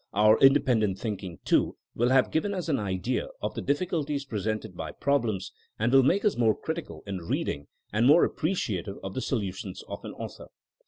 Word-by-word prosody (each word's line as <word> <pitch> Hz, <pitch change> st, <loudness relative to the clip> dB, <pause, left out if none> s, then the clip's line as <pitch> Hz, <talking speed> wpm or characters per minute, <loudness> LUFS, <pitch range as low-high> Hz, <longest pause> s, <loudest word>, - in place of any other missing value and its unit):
Our 105 Hz, +1 st, +5 dB
independent 130 Hz, -8 st, +4 dB
thinking, 95 Hz, -6 st, -5 dB
too, -, -, +2 dB, 0.2 s
will 120 Hz, +2 st, +1 dB
have 130 Hz, 0 st, +4 dB
given 200 Hz, +6 st, 0 dB
us 180 Hz, -2 st, -3 dB
an 140 Hz, -, +2 dB
idea 100 Hz, +5 st, -1 dB
of 105 Hz, -, -3 dB
the -, -, -4 dB
diflSculties 145 Hz, -2 st, -1 dB
presented 110 Hz, -2 st, -3 dB
by -, -, -5 dB
problems, 115 Hz, -9 st, 0 dB, 0.3 s
and 120 Hz, +4 st, +1 dB
will 135 Hz, -, +8 dB
make 185 Hz, -, +2 dB
us 210 Hz, -, +3 dB
more 110 Hz, -3 st, +3 dB
critical -, -, -5 dB
in 100 Hz, -1 st, -4 dB
reading 75 Hz, -3 st, -2 dB, 0.3 s
and 115 Hz, +4 st, +3 dB
more 150 Hz, +5 st, +7 dB
appreciative 105 Hz, -, -2 dB
of 95 Hz, 0 st, -5 dB
the 130 Hz, -, -3 dB
solutions 100 Hz, -7 st, -3 dB
of -, -, -7 dB
an -, -, -6 dB
author. -, -, -8 dB
115 Hz, 180 wpm, -28 LUFS, 100-140 Hz, 0.3 s, will